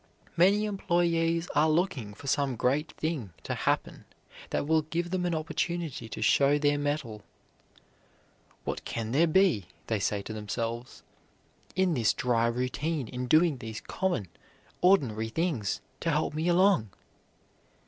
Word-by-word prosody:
Many 195 +5 +4
employees 170 -4 +1
are 155 +2 +4
looking 155 - 0
for - - -13
some 140 -1 +1
great 140 +7 0
thing 145 - -3
to - - -3
happen - - -1 0.4
that - - -1
will 160 +1 +3
give 170 +3 -3
them 180 -1 0
an 170 - 0
opportunity 160 -4 -3
to 110 0 -4
show 140 +6 +4
their 145 0 +2
mettle. 145 -7 -2 1.4
"What - - -4
can 115 -1 -4
there 160 +6 +4
be," 165 - +3 0.2
they 110 -2 -1
say 100 0 -1
to 110 - -6
themselves, 115 +3 -4 0.7
"in 185 -2 +2
this 115 -7 +2
dry 115 -2 +1
routine, 125 +3 -2
in 125 0 -4
doing 155 -1 +4
these 110 -1 -6
common, 180 - -2 0.5
ordinary 125 - +3
things, 135 - -1 0.2
to 165 - -1
help 155 -1 0
me 155 +3 -1
along?" 175 - +4
150 Hz, 140 wpm, -29 LUFS, 115-170 Hz, 1.4 s, Many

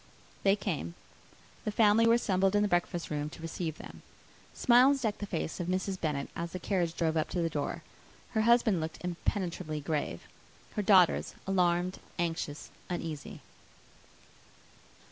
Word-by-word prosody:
They 195 0 +4
came. 155 - -3 0.7
The 215 - -1
family 220 +1 +5
were 230 - +6
assembled 195 -3 +2
in 205 - +4
the - - +2
breakfast 175 -2 -1
room 150 0 -2
to 160 - -12
receive 165 -1 -4
them. - - -11 0.5
Smiles 255 +3 +5
decked 215 -2 -1
the 205 - -4
face 165 -4 -3
of 175 - -3
Mrs. 185 +1 -2
Bennet, 145 -4 -1
as 170 0 -4
the 185 - -4
carriage 175 -3 -1
drove 160 -2 +1
up 155 - 0
to 175 - -1
the 165 - -1
door; 145 -2 -3 0.5
her 220 -3 +1
husband 225 -5 +4
looked 160 0 -4
impenetrably 175 -3 -2
grave; 145 - -2 0.5
her 210 - -2
daughters, 190 -4 +4
alarmed, 180 -1 +1 0.2
anxious, 165 -4 -3 0.2
uneasy. 160 -5 -5
180 Hz, 150 wpm, -31 LUFS, 160-205 Hz, 0.7 s, were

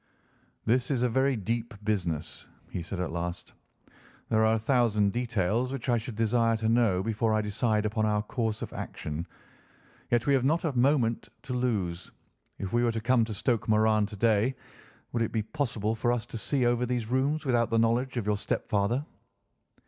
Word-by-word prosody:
"This 120 +2 +2
is 130 -4 +1
a 125 - +3
very 130 +3 +2
deep 115 +2 -3
business," 90 -8 -2 0.2
he 90 - -3
said 90 +2 -5
at 90 -3 -2
last. 85 +1 -4 0.8
"There 110 0 +3
are 110 0 +4
a - - +1
thousand 110 -4 +2
details 120 +1 0
which 135 -1 -4
I 120 - +4
should 110 0 -7
desire 115 +1 +2
to 110 0 -1
know 115 -6 +3
before 110 0 +1
I 110 - +2
decide 105 +1 0
upon 110 +1 0
our 105 0 +1
course 110 -1 -2
of - - -7
action. 75 +3 -5 0.8
Yet 120 -1 +2
we 140 - +3
have 135 -2 +3
not 160 +6 +2
a 155 -6 -1
moment 120 -4 +2
to 130 - -5
lose. 100 -9 -1 0.5
If 95 -2 -5
we 120 0 +3
were 120 -1 +2
to 110 - -1
come 120 +1 +3
to 110 - -5
Stoke 115 +2 0
Moran 110 -1 +3
to 105 - -9
day, 115 +4 +2 0.6
would 120 - -1
it 115 - 0
be 110 -2 0
possible 110 -4 -2
for 120 +2 0
us 120 -2 -1
to 120 - -10
see 130 +2 +1
over 120 +1 +2
these 120 -2 -1
rooms 135 +6 0
without 120 -3 +2
the 115 - +1
knowledge 120 +3 +1
of 115 - -1
your 105 -1 +1
stepfather?" 110 +6 -1
115 Hz, 195 wpm, -28 LUFS, 105-125 Hz, 0.8 s, are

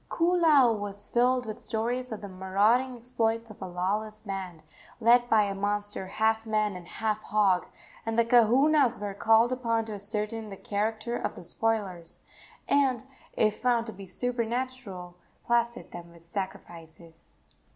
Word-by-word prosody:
Koolau 330 -8 +4
was 205 0 -3
filled 250 +1 +2
with 215 -1 -6
stories 240 +3 -1
of 220 - -5
the 205 - -6
marauding 205 +7 +1
exploits 230 -2 -1
of 215 - -15
a 190 - -4
lawless 205 +4 -2
band, 190 -6 -6 0.4
led 240 +1 +4
by 220 -2 +5
a 200 -1 -2
monster 205 0 -1
half 220 +3 0
man 215 -2 0
and 175 -1 -9
half 215 -1 -2
hog, 200 -4 +2 0.4
and 225 0 -3
the 235 - +4
kahunas 250 +3 +4
were 205 -1 -4
called 225 +4 +4
upon 230 -3 0
to 220 - -6
ascertain 210 +2 -2
the 195 - -8
character 220 +4 -2
of - - -3
the - - -10
spoilers, 190 -4 -2 0.5
and, 265 -4 +2 0.3
if 215 -1 +2
found 240 -2 +1
to 220 - -6
be 195 0 -10
supernatural, 235 -6 -3 0.3
placate 235 0 0
them 170 0 -9
with 170 0 -16
sacrifices. 170 -3 -8
220 Hz, 150 wpm, -28 LUFS, 195-240 Hz, 0.5 s, by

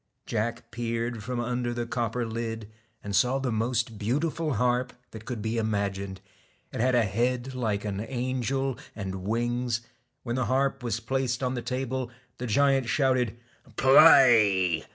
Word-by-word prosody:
Jack 115 +1 -3
peered 115 -1 -3
from 125 +1 -3
under 120 0 -2
the 120 0 -2
copper 120 0 -2
lid, 115 -1 -4 0.4
and 100 -1 -3
saw 125 +6 +3
the 135 -2 -2
most 115 0 -1
beautiful 150 +6 -1
harp 125 0 +1 0.2
that 110 -1 -10
could 120 -5 -5
be 115 +1 -1
imagined. 100 -3 -2 0.5
It - - -2
had 130 +1 +3
a 120 - +4
head 120 +5 -1
like 110 -5 -2
an 100 -1 -3
angel, 130 +1 -1 0.2
and 95 -2 -5
wings. 120 +1 0 0.4
When 120 0 -2
the 130 - 0
harp 135 +1 +1
was 115 -2 -2
placed 130 +1 -1
on 125 0 0
the 120 - -3
table, 130 -1 -3 0.3
the 125 - -3
giant 135 +2 +2
shouted 130 -5 +1 0.4
'Play!' 115 - +6
120 Hz, 155 wpm, -27 LUFS, 110-130 Hz, 0.5 s, Play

